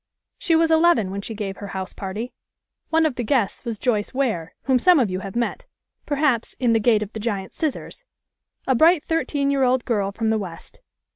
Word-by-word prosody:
She 330 Hz, -, +2 dB
was 325 Hz, 0 st, +3 dB
eleven 320 Hz, -, +4 dB
when 200 Hz, +1 st, -4 dB
she 220 Hz, +2 st, -7 dB
gave 200 Hz, -2 st, -4 dB
her 205 Hz, -, -7 dB
house 190 Hz, 0 st, -5 dB
party. 205 Hz, +5 st, -5 dB, 0.6 s
One 320 Hz, 0 st, +3 dB
of 295 Hz, -6 st, -1 dB
the 245 Hz, -, -1 dB
guests 230 Hz, -4 st, 0 dB
was 230 Hz, -3 st, -4 dB
Joyce 215 Hz, 0 st, -1 dB
Ware, 220 Hz, -12 st, -1 dB
whom 260 Hz, -2 st, +2 dB
some 360 Hz, +3 st, +5 dB
of 225 Hz, -7 st, +1 dB
you 185 Hz, -, -2 dB
have 195 Hz, +1 st, -8 dB
met, 235 Hz, 0 st, -2 dB, 0.4 s
perhaps, 285 Hz, -5 st, 0 dB
in 245 Hz, -3 st, +2 dB
"The 225 Hz, -, +3 dB
Gate 220 Hz, -1 st, +3 dB
of 210 Hz, -, -10 dB
the 220 Hz, -, -5 dB
Giant 205 Hz, -4 st, -3 dB
Scissors," 315 Hz, -, -4 dB, 0.6 s
a 265 Hz, -, +2 dB
bright 320 Hz, +4 st, +4 dB
thirteen 290 Hz, -4 st, 0 dB
year 275 Hz, -1 st, +1 dB
old 255 Hz, -1 st, +2 dB
girl 205 Hz, -4 st, 0 dB
from 220 Hz, +2 st, -1 dB
the 220 Hz, -, +1 dB
West. 180 Hz, -5 st, -9 dB
235 Hz, 210 wpm, -23 LUFS, 205-280 Hz, 0.6 s, some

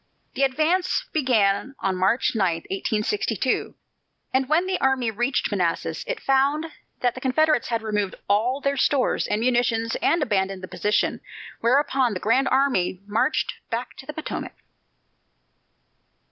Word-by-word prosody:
The 265 Hz, -, -3 dB
advance 320 Hz, -, +1 dB
began 245 Hz, -4 st, +1 dB
on 195 Hz, -1 st, 0 dB
March 190 Hz, +7 st, +2 dB
9, 190 Hz, -7 st, +1 dB, 0.2 s
1862, 215 Hz, -, -1 dB, 0.6 s
and 260 Hz, 0 st, +1 dB
when 325 Hz, +4 st, +3 dB
the 375 Hz, 0 st, -2 dB
army 260 Hz, -4 st, +2 dB
reached 240 Hz, +4 st, -1 dB
Manassas, 180 Hz, -5 st, -1 dB
it -, -, -3 dB
found 275 Hz, +2 st, +2 dB, 0.4 s
that 245 Hz, -1 st, +2 dB
the 255 Hz, -, -9 dB
Confederates 285 Hz, 0 st, +2 dB
had 230 Hz, -2 st, -2 dB
removed 210 Hz, -3 st, -1 dB
all 225 Hz, +7 st, +2 dB
their 280 Hz, 0 st, 0 dB
stores 265 Hz, 0 st, +1 dB
and 210 Hz, -, -1 dB
munitions 235 Hz, -2 st, +1 dB
and 335 Hz, -2 st, +2 dB
abandoned 195 Hz, -5 st, -1 dB
the -, -, -5 dB
position. 210 Hz, +3 st, 0 dB, 0.4 s
Whereupon 260 Hz, -2 st, +2 dB
the -, -, -3 dB
Grand 255 Hz, +7 st, +2 dB
Army 255 Hz, -10 st, +1 dB
marched 215 Hz, +9 st, 0 dB, 0.2 s
back 235 Hz, +1 st, -4 dB
to 265 Hz, -, -12 dB
the 300 Hz, -, -5 dB
Potomac. 315 Hz, -, -5 dB
250 Hz, 140 wpm, -24 LUFS, 210-275 Hz, 0.6 s, when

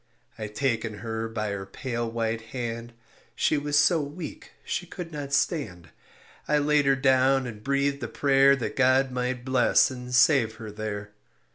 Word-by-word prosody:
I 110 Hz, -1 st, -5 dB
taken 115 Hz, -1 st, -2 dB
her 110 Hz, 0 st, -3 dB
by 110 Hz, -2 st, -3 dB
her 95 Hz, -1 st, -5 dB
pale 120 Hz, +2 st, -4 dB
white 115 Hz, 0 st, -2 dB
hand, 115 Hz, 0 st, -6 dB, 0.4 s
She -, -, +2 dB
was 145 Hz, 0 st, 0 dB
so 155 Hz, +2 st, +4 dB
weak 150 Hz, +3 st, -8 dB
she 180 Hz, -, -3 dB
could 175 Hz, -1 st, -7 dB
not 145 Hz, -2 st, -6 dB
stand; 140 Hz, -, -1 dB, 0.6 s
I 150 Hz, -, +3 dB
laid 145 Hz, -1 st, +2 dB
her 135 Hz, -, +5 dB
down 130 Hz, 0 st, +3 dB
and 105 Hz, -3 st, -8 dB
breathed 140 Hz, +1 st, 0 dB
a -, -, -3 dB
prayer 140 Hz, -1 st, +4 dB
That 130 Hz, -, -4 dB
God 130 Hz, 0 st, +3 dB
might 125 Hz, 0 st, -3 dB
bless 130 Hz, 0 st, +3 dB
and 125 Hz, -1 st, -8 dB
save 125 Hz, -7 st, +4 dB
her 110 Hz, -1 st, -8 dB
there. 105 Hz, -1 st, -5 dB
130 Hz, 165 wpm, -26 LUFS, 115-140 Hz, 0.6 s, her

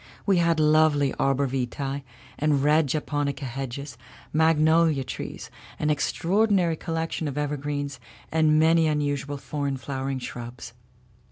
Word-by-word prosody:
We 195 Hz, -3 st, +3 dB
had 170 Hz, -1 st, +2 dB
lovely 150 Hz, -2 st, +4 dB
arborvitae 135 Hz, 0 st, -1 dB, 0.4 s
and 145 Hz, -2 st, +2 dB
red 150 Hz, +1 st, +4 dB
japonica 145 Hz, -1 st, -2 dB
hedges, 135 Hz, 0 st, -6 dB, 0.3 s
magnolia 160 Hz, -1 st, +3 dB
trees, -, -, -7 dB, 0.3 s
an 150 Hz, -, +1 dB
extraordinary 180 Hz, +4 st, +1 dB
collection 165 Hz, -1 st, -3 dB
of 140 Hz, 0 st, -5 dB
evergreens, 145 Hz, -1 st, -3 dB, 0.3 s
and 155 Hz, -1 st, +3 dB
many 160 Hz, +1 st, +4 dB
unusual 145 Hz, -1 st, -1 dB
foreign 140 Hz, -1 st, -3 dB
flowering 135 Hz, 0 st, -3 dB
shrubs. 120 Hz, -1 st, -7 dB
145 Hz, 110 wpm, -25 LUFS, 135-160 Hz, 0.4 s, lovely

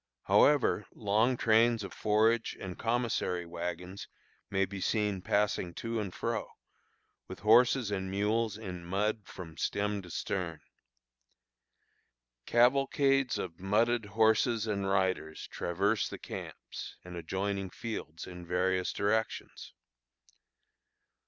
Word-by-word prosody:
However, 145 Hz, -7 st, +4 dB
long 110 Hz, +4 st, +2 dB
trains 115 Hz, 0 st, +4 dB
of 100 Hz, -, -7 dB
forage 110 Hz, +2 st, +2 dB
and 95 Hz, -2 st, -6 dB
commissary 115 Hz, -7 st, -1 dB
wagons 90 Hz, +2 st, -5 dB, 0.4 s
may 95 Hz, 0 st, +2 dB
be 95 Hz, 0 st, -7 dB
seen 105 Hz, -2 st, 0 dB
passing 100 Hz, -3 st, 0 dB
to 115 Hz, 0 st, -3 dB
and 100 Hz, -4 st, -3 dB
fro, -, -, -3 dB, 0.8 s
with 95 Hz, -, -9 dB
horses 120 Hz, +1 st, +5 dB
and 95 Hz, -1 st, -2 dB
mules 105 Hz, +2 st, 0 dB
in 90 Hz, -5 st, -7 dB
mud 105 Hz, +4 st, -1 dB
from 80 Hz, -3 st, -9 dB
"stem 105 Hz, 0 st, -1 dB
to 90 Hz, -, -12 dB
stern." 85 Hz, -2 st, -3 dB, 1.9 s
Cavalcades 135 Hz, +2 st, +3 dB
of 85 Hz, -3 st, -5 dB
mudded 110 Hz, +4 st, +2 dB
horses 110 Hz, +2 st, +3 dB
and 100 Hz, -3 st, -1 dB
riders 95 Hz, -5 st, 0 dB
traverse 100 Hz, +5 st, 0 dB
the -, -, -6 dB
camps -, -, -8 dB
and 90 Hz, 0 st, -8 dB
adjoining 95 Hz, +2 st, -2 dB
fields 90 Hz, -7 st, -6 dB
in 90 Hz, -1 st, -9 dB
various 90 Hz, +1 st, 0 dB
directions. 110 Hz, +2 st, -2 dB
100 Hz, 115 wpm, -31 LUFS, 95-115 Hz, 1.9 s, horses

